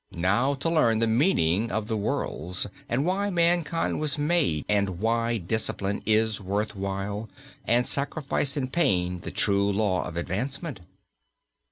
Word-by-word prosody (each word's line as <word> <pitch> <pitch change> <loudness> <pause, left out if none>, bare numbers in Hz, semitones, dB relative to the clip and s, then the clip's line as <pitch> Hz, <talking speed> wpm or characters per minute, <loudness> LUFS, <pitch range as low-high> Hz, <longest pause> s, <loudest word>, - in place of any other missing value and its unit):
Now 105 +11 +2
to 140 +4 -3
learn 155 -9 +3
the 115 - +2
meaning 110 - +2
of 110 +2 -1
the 110 - -2
worlds, 90 -4 -2 0.2
and 130 +5 +1
why 195 +3 0
mankind 170 -2 +1
was 150 -1 0
made, 150 - +1
and 100 -3 +1
why 115 +2 +1
discipline 100 0 -2
is 110 -1 +2
worth 100 +3 -2
while, 100 +2 -4 0.4
and 120 +2 +3
sacrifice 140 0 0
and 130 -2 -3
pain 90 - +1
the - - -7
true 100 0 +2
law 100 -4 +1
of 85 - -6
advancement." 130 - -3
110 Hz, 145 wpm, -26 LUFS, 100-140 Hz, 0.4 s, learn